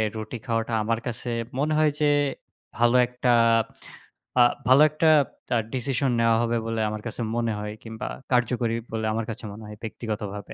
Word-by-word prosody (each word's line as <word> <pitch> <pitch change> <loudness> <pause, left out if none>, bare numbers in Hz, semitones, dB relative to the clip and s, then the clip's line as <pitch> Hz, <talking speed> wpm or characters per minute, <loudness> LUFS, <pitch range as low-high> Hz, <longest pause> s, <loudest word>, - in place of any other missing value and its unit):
রুটি 110 +2 -5
খাওয়াটা 115 -1 -1
আমার 115 +1 0
কাছে 120 +1 -4 0.3
মনে 155 +2 +1
হয় 155 -1 +4
যে, 150 - +3 0.7
ভালো 120 +1 +4
একটা, 125 +1 -2 1.1
আ - - +9 0.2
ভালো 130 +3 +7
একটা 155 +2 +1 0.4
তা - - +1 0.2
ডিসিশন 130 +1 0
নেয়া 115 -1 +4
হবে 120 0 +1
বলে 115 -1 -1
আমার 105 0 -5
কাছে 115 - -5
মনে 115 -1 0
হয়, 105 0 -5
কিংবা 110 -1 -6 0.2
কার্যকরী 120 -2 +1 0.2
বলে 110 -1 -2
আমার 115 0 -2
কাছে 115 +1 -6
মনে 110 +2 -10
হয়, 105 - -8
ব্যক্তিগতভাবে। 105 -3 -5
115 Hz, 165 wpm, -25 LUFS, 110-125 Hz, 1.1 s, আ